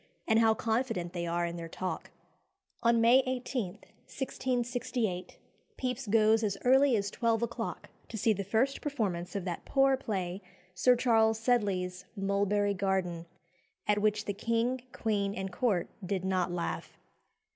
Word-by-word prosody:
and 220 -1 +4
how 225 -1 +5
confident 225 -6 -1
they 170 -1 -3
are 170 +1 0
in 170 0 -4
their 165 -1 -6
talk!" 185 +2 -4 0.7
On 235 0 +4
May 235 +3 +6
18, 250 -6 -2 0.3
1668, 245 -7 -2 0.4
Pepys 250 -1 -3
goes 220 +1 +4
as 200 -3 -1
early 265 0 +5
as 200 -2 -1
twelve 230 -1 +1
o'clock 235 0 -4 0.2
to 225 - -5
see 220 +2 +3
the 200 0 -3
first 230 +8 +1
performance 205 - -2
of 195 -2 -2
that 175 -2 -4
poor 270 -1 +3
play, 195 -7 -3 0.3
Sir 250 +7 +4
Charles 225 -3 +3
Sedley's 195 -6 0
"Mulberry 200 +1 +1
Garden," 185 -3 -1 0.6
at 210 0 +2
which 210 0 +1
the 205 - -2
king, 230 +4 0
queen, 205 -4 -1
and 190 -1 -4
court 205 -8 +1 0.2
did 185 0 -2
not 185 -2 +1
laugh. 175 -1 -4
215 Hz, 145 wpm, -31 LUFS, 185-235 Hz, 0.7 s, May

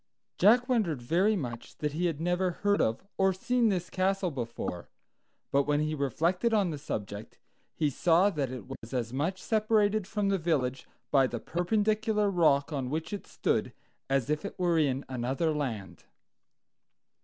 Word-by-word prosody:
Jack 240 +6 +5
wondered 210 - +1
very 175 - +2
much 120 - -6
that 150 -1 -2
he 175 +3 0
had 160 -4 -3
never 180 +2 +1
heard 205 +4 +1
of 110 +8 0 0.2
or 190 0 +4
seen 235 +5 +1
this 180 -3 -2
castle 190 -1 0
before; 115 - -5 0.6
but 140 0 +2
when 145 0 +2
he 155 +1 0
reflected 170 - +1
on 195 -5 +2
the 150 - -5
subject, 105 -4 -6 0.4
he 155 - +1
saw 175 +7 +3
that 145 -7 -2
it 125 -6 -7
was 115 +4 -8
as 120 -1 -2
much 165 +8 -1
separated 215 -2 +1
from 210 -2 -1
the 195 -1 +1
village 135 -6 -1 0.2
by 135 -2 +5
the 120 -2 -4
perpendicular 210 - +1
rock 155 -5 +3
on 135 -3 -2
which 160 +5 -3
it 205 - -6
stood - - -1 0.4
as 135 -2 +1
if 150 0 -1
it 200 - -6
were 175 -3 +2
in 140 -3 0
another 130 +6 -1
land. 120 -10 -4
165 Hz, 165 wpm, -29 LUFS, 135-195 Hz, 0.6 s, Jack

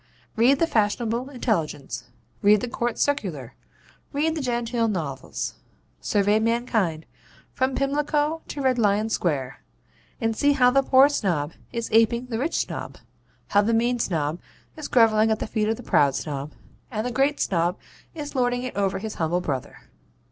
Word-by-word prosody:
Read 245 +5 +4
the 330 - +3
fashionable 235 -1 0
intelligence; 165 - -2 0.4
read 205 +1 +5
the - - -2
COURT 235 -1 -2
CIRCULAR; 180 - -1 0.6
read 310 +3 0
the 315 - -3
genteel 240 -2 0
novels; 155 -10 -3 0.5
survey 205 +1 +2
mankind, 220 -8 0 0.5
from 260 0 0
Pimlico 295 +3 0
to 285 - -5
Red 255 -2 +2
Lion 210 0 +2
Square, 135 -10 -1 0.6
and 225 -3 0
see 285 +5 +3
how 250 -3 +4
the 275 +1 +4
Poor 265 +1 +6
Snob 175 - -1 0.2
is 235 -1 -3
aping 230 +2 +3
the 230 -3 -4
Rich 300 +6 -1
Snob; - - -4 0.5
how 205 - +4
the 225 +2 +1
Mean 240 +2 +1
Snob 160 -5 -1 0.4
is 310 - -6
grovelling 225 -2 +4
at 220 - +2
the - - -4
feet 215 -1 -1
of 225 - 0
the 245 - -10
Proud 140 - +3
Snob; 145 -1 -4 0.4
and 220 -2 -3
the 250 - -2
Great 275 +4 +1
Snob 175 0 0 0.4
is 295 -2 -6
lording 245 -2 0
it 255 - -5
over 195 -1 0
his 215 +2 -5
humble 165 +2 +1
brother. 140 -7 -4
225 Hz, 160 wpm, -24 LUFS, 190-255 Hz, 0.6 s, Poor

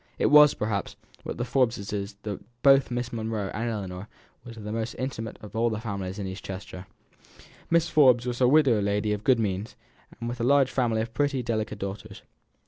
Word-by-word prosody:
It - - +2
was, 150 -1 +8
perhaps, 105 -2 -2 0.3
with - - -5
the 120 - -2
Forbeses 105 -5 -1
that 110 +3 -8
both 135 -1 +6
Miss 120 0 -3
Monro 110 -3 -3
and 115 +2 -2
Ellinor 95 -3 -5 0.4
were 120 - -10
the 105 -2 -7
most 115 +1 -3
intimate 120 -4 -5
of 105 - -10
all 115 +1 +2
the 110 -2 -3
families 100 -4 -5
in 100 - -4
East 95 +1 -7
Chester. 95 -1 -8 0.8
Mrs. 170 0 +3
Forbes 130 -5 +5
was 125 0 -3
a 125 - +6
widow 130 -6 +4
lady 105 +1 0
of 105 0 -4
good 130 0 +4
means, 100 0 -2 0.4
with 120 +1 -4
a - - 0
large 135 +1 +4
family 115 -4 +1
of 115 0 -8
pretty, 140 -3 0
delicate 110 -2 -2
daughters. 100 +1 -7
115 Hz, 190 wpm, -26 LUFS, 105-125 Hz, 0.8 s, was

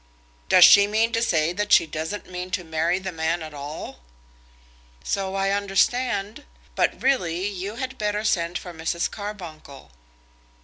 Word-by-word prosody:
"Does - - +9
she 200 0 +7
mean 220 +2 +1
to 230 - 0
say 165 -7 +1
that 210 +2 -3
she - - +6
doesn't 160 +6 -5
mean 180 0 -6
to 180 - -10
marry 160 +2 0
the 190 0 -5
man 165 0 -2
at 155 -1 -9
all?" 145 - -8 1.0
"So 195 -1 -2
I 195 0 +1
understand; 205 +4 0 0.3
but - - 0
really 185 -9 +1
you 200 +1 -5
had 260 +1 -5
better 210 0 -1
send 170 -4 0
for 175 - -9
Mrs. 165 +1 -2
Carbuncle." 170 - -9
190 Hz, 150 wpm, -24 LUFS, 165-210 Hz, 1.0 s, Does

